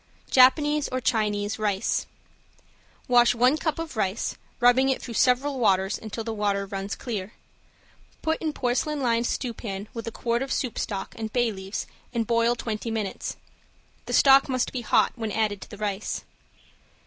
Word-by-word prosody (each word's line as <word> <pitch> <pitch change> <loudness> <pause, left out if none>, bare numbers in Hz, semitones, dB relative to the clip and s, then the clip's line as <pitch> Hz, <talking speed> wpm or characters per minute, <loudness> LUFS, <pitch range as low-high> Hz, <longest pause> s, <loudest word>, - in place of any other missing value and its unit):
~JAPANESE 295 +3 +5
OR 255 - -2
CHINESE 215 -3 0
RICE~ 205 -2 0 1.0
Wash 245 -1 +5
one 250 +4 +4
cup 315 0 -2
of 330 -4 -5
rice, 205 -1 -1 0.2
rubbing 245 +2 +5
it 265 - +1
through 235 - -7
several 260 +4 +2
waters 195 -3 +2
until 220 +1 -5
the 225 0 -3
water 200 -2 0
runs 195 +1 -4
clear. 215 -5 -5 0.9
Put 320 0 0
in 315 - -1
porcelain 280 +3 -1
lined 235 -1 +2
stewpan 215 -5 -4
with 230 -2 -6
a - - -2
quart 235 +2 -1
of 270 0 -3
soup 250 -5 -1
stock 195 -2 -4
and 220 -1 -5
bay 240 -1 +2
leaves 195 0 -5 0.3
and 230 -1 +1
boil 230 +1 +2
twenty 225 -1 -4
minutes. 220 -3 -3 0.7
The - - -3
stock 275 0 +6
must 255 -1 0
be 255 - -2
hot 230 - +3
when 225 -3 -4
added 210 -2 0
to - - -10
the 205 - -10
rice. 205 0 -3
230 Hz, 165 wpm, -26 LUFS, 210-255 Hz, 1.0 s, stock